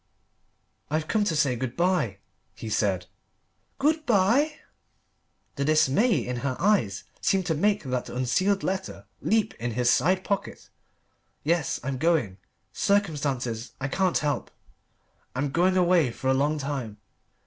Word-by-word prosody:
"I've 155 +1 -1
come 215 -2 +1
to 165 - 0
say 140 -4 +2
good 120 0 -4
bye," 170 - +1 0.4
he 110 - -7
said. 95 -4 0 0.7
"Good 310 +3 +1
bye?" 240 +8 +3 1.0
the 140 - 0
dismay 155 - +3
in 125 0 -3
her 130 0 -2
eyes 175 - +1 0.2
seemed 190 -2 +1
to 170 - +1
make 200 +6 +1
that 125 -2 -3
unsealed 185 +11 0
letter 190 - -3 0.2
leap 220 0 +1
in 120 0 -3
his 120 +1 +2
side 185 +3 +2
pocket. 200 0 -4 0.7
"Yes 165 -1 0
I'm 130 0 -3
going 145 - +1 0.3
circumstances 140 - -1
I 135 +1 -2
can't 185 +4 +1
help 145 -2 -1 0.9
I'm 135 +2 -1
going 185 +4 +2
away 175 -6 +4
for 130 +3 -3
a - - +4
long 145 +3 +1
time." 135 -7 -4
150 Hz, 135 wpm, -26 LUFS, 125-190 Hz, 1.0 s, away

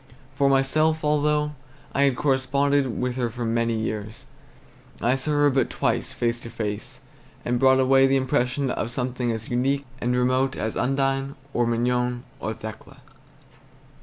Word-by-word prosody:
For 140 +1 +2
myself, 155 +4 +2
although 150 0 +2 0.4
I 140 - +3
had 135 -2 +2
corresponded 140 0 +1
with 125 0 -2
her 120 -2 0
for 120 +1 -5
many 115 0 0
years, 110 -1 -4 0.7
I 120 - +2
saw 135 +3 -2
her 145 -1 +3
but 130 -2 +1
twice - - -1
face 120 0 -1
to 115 - -9
face, 105 -3 -5 0.4
and 120 0 0
brought 130 0 +5
away 135 +1 +5
the 135 - +2
impression 130 0 0
of 115 - -2
something 125 0 -2
as 110 +1 -5
unique 135 +3 +1
and 125 0 0
remote 130 +2 +1
as 110 0 -3
Undine 135 +1 0 0.2
or 120 -1 +1
Mignon 125 +1 0 0.2
or 110 - -3
Thekla. 115 +5 -10
130 Hz, 155 wpm, -24 LUFS, 120-135 Hz, 0.7 s, brought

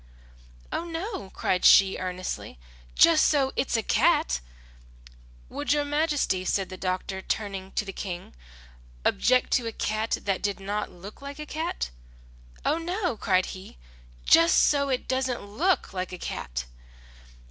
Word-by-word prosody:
"Oh, - - -2
no," 335 - -5
cried 185 -1 -1
she, 195 0 +7
earnestly, 185 - -5 0.4
"just 330 -2 +6
so 275 -3 +2
it's 250 - +1
a 225 - -1
cat!" - - +2 1.1
"Would 290 0 -1
your 295 -1 +1
majesty," 290 - 0
said 190 0 0
the 185 - -7
doctor 185 +1 -3
again, - - -13
turning 195 -3 -3
to 210 - -1
the 195 - -6
King, 180 -3 -6 0.7
"object 255 +1 +3
to 245 -3 +2
a - - -2
cat 215 +1 -1
that 195 -2 -1
did 200 -1 -1
not 205 +2 -3
look 195 +7 -12
like 280 +1 -7
a 305 - -6
cat?" 315 - -3 0.7
"Oh, 315 - +2
no," 355 - -1
cried 185 -3 +2
he, 185 - -11 0.5
"just 165 - +6
so 280 -1 +3
it 255 -2 -1
doesn't 260 -3 -1
look 315 - 0
like 185 -1 -3
a 180 - -6
cat!" - - -5
210 Hz, 150 wpm, -27 LUFS, 185-290 Hz, 1.1 s, she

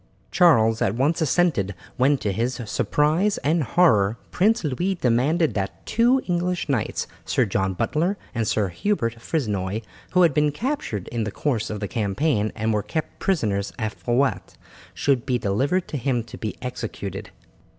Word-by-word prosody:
Charles 115 -11 +4
at 95 - +1
once 145 +7 +1
assented, 140 - +1 0.2
when, 140 +2 +3
to 105 - -2
his 120 +7 -1
surprise 155 - +1
and 160 +3 +2
horror, 115 - +3
Prince 215 +2 +2
Louis 175 +7 -1
demanded 145 +4 +2
that 100 -1 -4
two 245 +3 +3
English 175 -1 -1
knights, 135 -7 -1 0.2
Sir 125 - +1
John 95 -2 -1
Butler 170 - 0 0.2
and 115 -3 -1
Sir 105 -3 +1
Hubert 115 - -1
Frisnoy, 105 - -2 0.3
who 180 0 +5
had 165 -4 +4
been 150 +1 +2
captured 150 - -3
in 115 -2 -2
the 105 - -2
course 115 -1 -1
of 105 -1 -5
the 100 - -2
campaign 110 +2 0
and 110 0 0
were 105 - +1
kept 155 +8 -4
prisoners 105 - 0
at 110 -2 -2
Faouet, 120 -5 -1 0.4
should 135 -4 +1
be 125 -3 0
delivered 135 - 0
to 150 - -3
him 125 -2 0
to 115 - -11
be 110 - -4
executed. 125 0 -5
125 Hz, 160 wpm, -24 LUFS, 110-165 Hz, 0.4 s, who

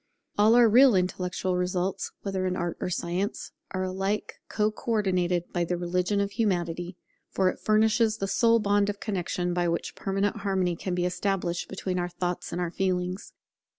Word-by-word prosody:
All 215 +3 +5
our 240 -1 +7
real 245 +1 +6
intellectual 180 0 -1
results, 180 +1 -1
whether 190 -2 -1
in 185 - -1
art 175 -2 -2
or - - -1
science, 180 +3 -2 0.2
are 185 0 -2
alike 195 +3 -2
co 210 0 +1
ordinated 180 -6 0
by 175 - +1
the 175 +1 -1
religion 180 +3 0
of 200 0 0
Humanity; 175 -4 -1 0.3
for 190 -1 +2
it - - -5
furnishes 220 +1 +3
the 195 - -2
sole 230 +3 +4
bond 205 -2 +2
of 205 0 -4
connexion 180 -3 -2
by 175 0 +1
which 170 0 -2
permanent 195 +1 -1
harmony 190 -3 0
can 180 +1 -3
be 180 0 0
established 180 -1 -1
between 185 -1 -3
our 175 0 -2
thoughts 175 0 -3
and 175 - -3
our 175 -2 -1
feelings. 185 +1 -2
185 Hz, 175 wpm, -27 LUFS, 180-205 Hz, 0.3 s, our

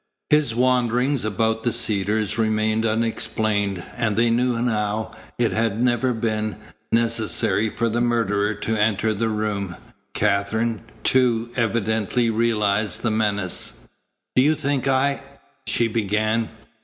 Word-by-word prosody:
His 150 -6 +3
wanderings 125 +1 +1
about 110 +2 0
the 120 - +1
Cedars 110 -1 +1
remained 110 0 +1
unexplained, 110 -3 -1
and 115 -4 -1
they 115 0 +3
knew 120 0 +1
now 110 -2 -1 0.3
it 120 -2 +1
had 110 -1 0
never 125 +1 +2
been 110 -2 -2 0.4
necessary 115 -1 +1
for 115 +2 -1
the 115 +1 -1
murderer 105 -3 +1
to 110 +2 -2
enter 110 0 +1
the 110 +2 -1
room, 105 -4 -2 0.4
Katherine, 110 +2 0 0.2
too, 120 -3 +2
evidently 115 0 0
realized 110 -2 0
the 115 - +1
menace. 100 -4 +1 0.6
"Do 130 - +5
you 150 +4 +3
think 140 -2 -1
I 135 +1 +1 0.2
" 130 -1 -35
she 115 - +3
began. 110 +1 0
110 Hz, 130 wpm, -22 LUFS, 105-120 Hz, 0.6 s, Do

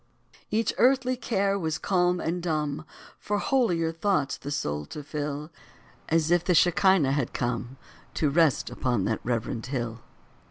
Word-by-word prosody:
Each 220 0 +1
earthly 255 0 +4
care 200 -5 0
was 160 -3 -1
calm 180 -1 +1
and 170 +2 -2
dumb, 155 -3 -2 0.3
For 205 - -1
holier 190 - +1
thoughts 165 -5 0
the 140 - -8
soul 75 - -2
to 150 - -7
fill; 150 +1 -4 0.6
As 165 0 +2
if 175 -1 +4
the 180 - +2
Shechinah 180 -4 +4
had 140 -3 -1
come 120 +2 -3 0.4
To 150 -3 +1
rest 160 -2 +2
upon 120 -6 0
that 110 - 0
reverend 115 -1 -2
hill. 120 -3 -3
160 Hz, 150 wpm, -27 LUFS, 135-185 Hz, 0.6 s, earthly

